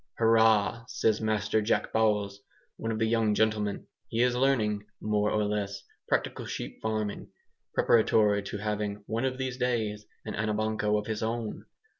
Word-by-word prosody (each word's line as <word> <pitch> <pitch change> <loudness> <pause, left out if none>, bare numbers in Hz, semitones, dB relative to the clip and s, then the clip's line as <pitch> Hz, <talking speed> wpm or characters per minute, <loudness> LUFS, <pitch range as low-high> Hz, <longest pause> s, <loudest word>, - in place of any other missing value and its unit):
"Hurrah!" 115 0 +4
says 110 -3 +1
Master 110 0 +1
Jack 105 - 0
Bowles, 105 -3 +1 0.4
one 115 - -3
of 110 - -2
the 110 - +1
young 110 -2 +2
gentlemen. 105 -2 0 0.2
He 115 +2 +1
is 125 0 +2
learning 110 -6 +1
(more 105 -1 +1
or 105 0 +1
less) 100 -1 -2 0.3
practical - - -1
sheep - - -6
farming, 110 -2 -2 0.5
preparatory 105 -2 +4
to 100 +1 -5
having 105 0 -3
(one 115 +5 -1
of 130 -1 -1
these 130 -1 -3
days) 110 -4 -1 0.2
an - - -4
Anabanco 110 0 0
of 105 - -3
his 110 -1 -3
own. 115 -1 -3
110 Hz, 155 wpm, -29 LUFS, 105-115 Hz, 0.5 s, Hurrah